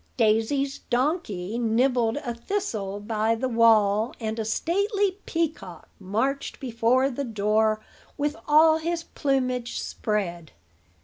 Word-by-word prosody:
Daisy's 235 +5 +1
donkey 240 - -1
nibbled 240 +1 +2
a 240 - -2
thistle 230 - -3
by 220 +1 0
the 255 +3 -2
wall, 225 -2 +3
and 220 -1 -3
a 220 - -2
stately 395 - 0
peacock 305 - -3
marched 225 +9 -2
before 255 +2 +1
the 280 +3 -3
door 215 -1 +1 0.4
with 295 +1 -1
all 315 +1 +6
his 335 +1 -2
plumage 255 -5 -1
spread. 175 -7 -3
235 Hz, 115 wpm, -25 LUFS, 215-280 Hz, 0.4 s, all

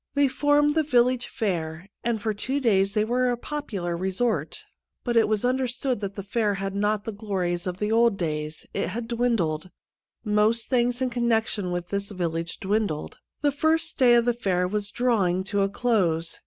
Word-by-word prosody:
They 285 0 +4
formed 290 +2 +3
the 320 - +3
village 250 -3 +2
fair, 170 -4 -3 0.2
and 235 -2 0
for 215 0 -1
two 260 +7 -2
days 200 -6 +2
they 215 0 +2
were 250 +2 +1
a 245 - 0
popular 220 - -4
resort. 190 +6 -1 0.4
But 240 -1 -1
it 230 - +5
was 215 +2 0
under 255 +1 +1
stood 255 0 -2
that 200 -1 -5
the 200 - -5
fair 205 0 0
had 195 0 -3
not 205 +1 0
the 225 - -4
glories 190 -4 -2
of 180 +1 -4
old 225 0 +3
days; 155 -2 -3
it - - -1
had 225 +4 -4
dwindled. 225 -9 0 0.6
Most 215 +2 +2
things 245 0 +2
in 255 - -1
connection 225 -5 0
with 175 0 -3
this 200 0 -2
village 170 -3 -3
dwindled. 200 -6 -2 0.2
The 290 -1 +3
first 315 +3 +1
day 245 -2 +6
of 235 -1 +4
the 240 - +3
fair 185 -6 0
was 205 +1 -2
draw 235 -4 +1
ing 180 +2 0
to 200 +1 0
a 195 - +2
close. 180 -8 0
215 Hz, 190 wpm, -25 LUFS, 190-245 Hz, 0.6 s, day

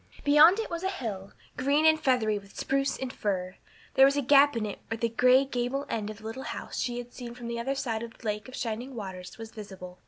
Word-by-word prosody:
Beyond 300 +6 +7
it 450 - -3
was 335 0 -3
a 380 - 0
hill, 210 - -5 0.3
green 280 +4 +2
and 315 0 +6
feathery 225 -7 +2
with 200 0 -17
spruce 275 0 0
and 260 -1 -5
fir; 185 -3 -2 0.4
there 265 - +6
was 280 +1 +1
a 285 - +1
gap 285 0 +6
in 220 - -1
it 205 - -5
where 225 - -3
the 230 +1 0
gray 255 +4 +5
gable 265 +2 -2
end 215 -2 -2
of 215 - -7
the 220 - -16
little 225 +4 -5
house - - -5
she 245 -1 -1
had 245 0 -7
seen 240 -2 -8
from 245 -1 -9
the 235 0 -3
other 270 +4 -1
side 230 -5 -2
of 230 -1 -8
the - - -16
Lake 210 +1 -2
of 255 - -9
Shining 240 +3 -4
Waters 190 -4 -7
was 225 -1 -8
visible. 190 -4 -10
240 Hz, 250 wpm, -28 LUFS, 215-275 Hz, 0.4 s, Beyond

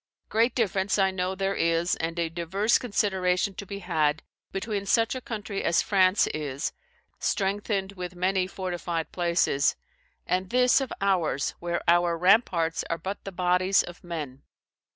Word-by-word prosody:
"Great 230 +2 +2
difference 195 -4 +1
I 190 -1 +3
know 185 0 -2
there 195 +1 -1
is, 170 +1 +1
and 165 +1 -3
a 170 -1 +1
diverse 180 +7 +1
consideration 190 -4 0
to 200 +1 -8
be 200 - -5
had, 160 -5 0 0.3
between 200 0 -3
such 225 +2 +3
a 255 - -5
country 210 -4 -5
as 170 - +3
France 190 -1 +4
is, 145 -1 -3 0.5
strengthened 200 0 -1
with 180 -2 -7
many 185 +1 +1
fortified 175 -3 -4
places; 170 -5 +1 0.5
and 185 0 -1
this 250 +3 +4
of 265 - -4
ours, 180 -8 +1
where 170 0 -2
our 175 0 +3
ramparts 180 -3 +3
are 165 - 0
but 190 +5 -6
the 195 - -5
bodies 180 +1 +2
of 175 0 -11
men. 150 -6 -6
185 Hz, 150 wpm, -27 LUFS, 170-200 Hz, 0.5 s, France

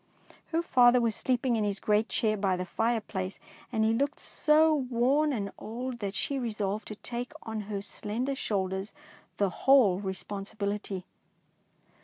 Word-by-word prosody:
Her 330 +1 0
father 250 -5 +6
was 230 -3 +1
sleeping 255 -1 +1
in 215 - +1
his 200 -1 -1
great 210 +1 +2
chair 215 -1 +1
by 195 -2 +1
the 180 - -3
fireplace, 210 -3 -1 0.3
and 220 0 +2
he 220 - +3
looked 280 +5 0
so 310 +1 +3
worn 265 +2 +2
and 205 -6 -2
old 245 +2 -5
that 200 -2 -3
she 275 +6 -1
re 240 -3 -2
solved 210 0 -2
to 215 - -6
take 245 +5 -5
on 220 -1 -4
her 210 - -3
own 200 - -2
slender 230 +7 -3
shoulders 190 -5 -2 0.4
the 200 -2 +2
whole 245 -9 +5
responsibility. 200 0 -4
220 Hz, 160 wpm, -29 LUFS, 200-250 Hz, 0.4 s, father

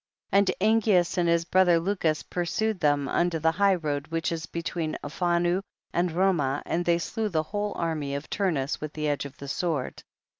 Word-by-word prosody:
24. 200 - +5 0.2
And 220 +3 +3
Angeas 180 -5 +3
and 170 -1 +2
his 170 0 +2
brother 180 -1 +4
Lucus 165 -4 0
pursued 185 +4 -1
them 145 -3 +2
unto 175 +2 +1
the 160 +1 +2
high 195 +3 +3
road, 145 -3 -3
which 165 +1 -2
is 165 -2 -4
between 165 -1 -3
Alphanu 175 +3 +1 0.3
and 175 +1 +1
Romah, 160 -6 +1
and 175 - -1
they 170 0 +3
slew 215 +5 -2
the 160 -4 0
whole 205 +5 -3
army 155 -4 -2
of 140 +2 -5
Turnus 160 -9 -1
with 155 0 -5
the 155 -1 -2
edge 145 -1 -1
of 140 0 -9
the 140 - -8
sword. 150 -2 -2
170 Hz, 190 wpm, -27 LUFS, 155-185 Hz, 0.3 s, 24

